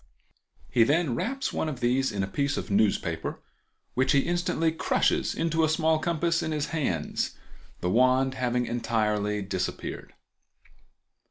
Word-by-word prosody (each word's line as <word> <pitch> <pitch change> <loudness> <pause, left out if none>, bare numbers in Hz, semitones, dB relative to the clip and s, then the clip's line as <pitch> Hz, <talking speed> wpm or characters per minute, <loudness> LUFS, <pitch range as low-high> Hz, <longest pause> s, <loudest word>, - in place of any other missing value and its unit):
He 115 - +5
then 145 +2 +2
wraps 265 - -2
one 160 - -1
of 135 -5 -6
these 130 +2 +1
in 100 -1 -2
a - - -2
piece 140 +8 -1
of - - -4
newspaper 105 0 0 0.5
which 130 +2 +2
he 140 - +5
instantly 175 -1 0
crushes 160 - +1
into 165 0 +1
a 160 - +3
small 160 0 +2
compass 170 +1 0
in 160 - -2
his 150 -1 -2
hands, 90 - -1 0.5
the 90 - 0
wand 130 +3 +3
having 125 -1 0
entirely 105 -3 0
disappeared. 95 -1 -4
130 Hz, 145 wpm, -27 LUFS, 115-160 Hz, 0.5 s, He